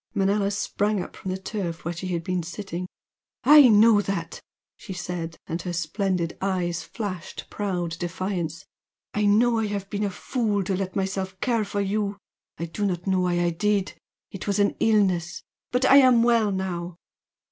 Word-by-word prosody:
Manella 200 +1 +2
sprang 205 +1 0
up 175 - -6
from 190 - -6
the 185 - -1
turf 190 -4 -5
where 170 - -1
she 175 +2 -6
had 170 -2 -2
been 180 0 -1
sitting. 180 +1 -6 0.6
"I 295 -2 +9
know 215 0 +6
that!" 195 -4 -4 0.3
she 195 - -8
said, 175 -2 -5
and 165 +1 -3
her 175 0 -4
splendid 175 0 -1
eyes 180 -3 -1
flashed 195 -7 -6
proud 175 -5 -3
defiance 175 -2 -3 0.5
"I 210 0 +1
know 230 +3 +4
I 220 - 0
have 200 -1 -4
been 205 0 -1
a 205 - +1
fool 205 0 -1
to 190 +1 -1
let 185 0 -3
myself 190 -1 -2
care 235 -3 +1
for 200 0 -2
you! 200 0 -1 0.4
I 170 - -3
do 170 +5 -5
not 175 -2 -3
know 190 -1 +2
why 175 -1 +1
I 175 0 +2
did 200 +3 0 0.4
it 195 - -7
was 200 -1 +1
an 205 0 +2
illness! 185 -5 +1 0.3
But 250 +1 +2
I 270 - +7
am 255 -4 +6
well 230 -3 +3
now!" 180 -2 -3
195 Hz, 180 wpm, -25 LUFS, 175-205 Hz, 0.6 s, I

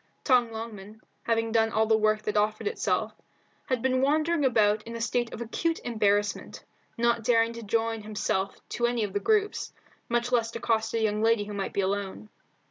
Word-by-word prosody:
Tom 250 -4 +4
Longman, 220 -2 -8 0.2
having 225 -1 0
done 225 0 +3
all 220 0 +2
the 220 0 +3
work 215 0 +2
that 210 - -2
offered 210 +1 +1
itself, 425 +2 -1 0.5
had 255 -3 -1
been 260 0 +2
wandering 310 +3 +2
about 215 -5 +3
in 230 +2 -8
a - - -4
state 230 +1 -1
of - - -7
acute 325 +8 -1
embarrassment, 205 -3 0 0.3
not 235 0 +1
daring 230 0 +3
to 235 - -8
join 225 +1 -1
himself 210 -2 -2
to 240 - 0
any 240 -2 0
of 200 -2 -4
the 205 - 0
groups, 420 - 0 0.4
much 240 +1 0
less 230 -2 +1
accost 225 -1 0
a - - +1
young 210 0 0
lady 225 -1 +3
who 205 0 -7
might 200 -1 -3
be 200 - +1
alone. 200 +2 -3
225 Hz, 190 wpm, -27 LUFS, 210-240 Hz, 0.5 s, Tom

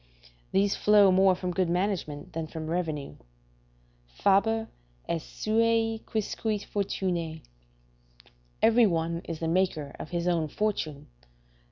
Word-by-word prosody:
These 200 +1 +2
flow 205 -2 +5
more 190 0 +5
from 180 0 -3
good 180 0 0
management 175 -5 -2
than 160 -1 -3
from 160 0 -6
revenue; 155 -5 -3 0.9
"Faber 210 - +2 0.4
est 165 -1 -1
suae 225 0 +1
quisque 215 -1 -2
fortunae" 175 -6 -2 1.2
["Every 230 +1 +6
one 170 -1 -1
is 165 -2 -5
the 165 - -1
maker 165 -5 0
of - - -7
his 175 0 -2
own 165 -3 +1
fortune." 155 -6 -2
180 Hz, 120 wpm, -28 LUFS, 165-210 Hz, 1.2 s, Every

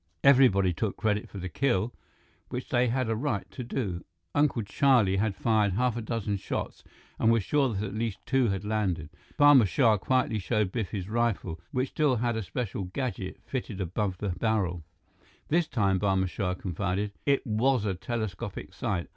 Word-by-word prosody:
Everybody 125 -10 +5
took 100 +4 -2
credit 105 -2 0
for - - -9
the 90 -1 -4
kill, 120 +2 0 0.6
which 125 - -5
they 125 0 +3
had 125 +1 0
a 115 - 0
right 115 -3 -2
to 125 - -6
do. 100 -8 -3 0.3
Uncle 145 -6 +2
Charlie 110 -3 +3
had 105 0 0
fired 105 -1 +2
half 125 +3 +1
a 120 - -3
dozen 110 -2 -2
shots - - -4 0.4
and 115 - +4
was 115 -3 +2
sure 140 +4 +2
that 105 -3 -2
at 100 - -6
least 110 -1 -2
two 130 -2 +2
had 100 -1 -2
landed. 95 -8 -1 0.3
Barma 145 -6 +7
Shah 110 +2 +3
quietly 130 -2 +1
showed 105 -1 0
Biff 110 -5 -2
his 95 -3 -4
rifle, 105 -7 -1
which 130 +1 0
still 150 -5 +2
had 120 0 0
a 110 - -1
special 100 -1 -4
gadget 95 -2 -4
fitted 120 -6 -4
above 95 +1 -2
the 105 - -3
barrel. 90 -3 0 0.7
"This 165 +1 +2
time," 100 -7 +1
Barma 95 -2 +2
Shah 90 0 -2
confided, 95 +3 -2 0.2
"it 140 -1 +2
was 120 +1 +2
a 100 - 0
telescopic 110 -1 -5
sight. 85 -2 -2
110 Hz, 180 wpm, -28 LUFS, 95-125 Hz, 0.7 s, Barma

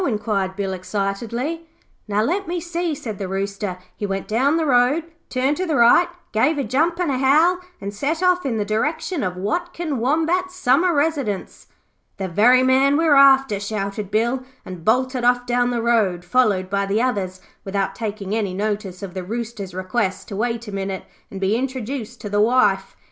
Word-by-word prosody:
inquired 210 -4 -1
Bill 195 -1 -2
excitedly. 225 - -3 0.4
'Now, 210 +1 +1
let 370 - -1
me 350 +1 -2
see,' 340 -1 -2
said 220 -7 -6
the 195 - -3
Rooster. 195 0 -3 0.2
'He 205 - -3
went 195 0 -3
down 270 +8 +2
the 325 - 0
road, 265 +4 +3 0.3
turned 265 +3 0
to 370 - -2
the 315 - 0
right, 240 +8 +6 0.2
gave 265 +9 +2
a 280 - 0
jump 320 +7 +1
and 350 -5 +1
a 255 - -1
howl, 310 +7 +4 0.2
and 200 0 -5
set 300 - -2
off 360 0 +3
in 245 -5 -1
the 210 - -1
direction 300 - -1
of 180 -2 -2
Watkin 315 - -2
Wombat's 330 +8 0
summer 335 +3 +3
residence.' 285 - -1 0.5
'The 190 -2 -3
very 245 +8 +5
man 265 +2 +4
we're 320 -2 +4
after,' 270 -6 +6
shouted 200 -1 -4
Bill, 235 +5 +1 0.2
and 180 -3 -8
bolted 255 +3 +1
off 245 0 +3
down 245 0 +1
the 240 -2 -1
road, 205 -7 +1
followed 200 -3 +2
by 200 +1 -1
the 200 +2 +1
others, 200 -7 -1 0.2
without 195 0 -2
taking 210 -3 -4
any 205 -4 -1
notice 205 -2 -3
of 190 -3 -6
the 185 -1 -4
Rooster's 215 -2 -5
request 190 +1 -2
to 200 - -5
wait 230 +1 -2
a - - -6
minute 195 -1 -4 0.2
and 195 - -7
be 195 +3 +1
introduced 250 -1 -4
to - - -5
the 205 +1 +2
wife. 210 -4 +2
235 Hz, 185 wpm, -21 LUFS, 200-275 Hz, 0.5 s, right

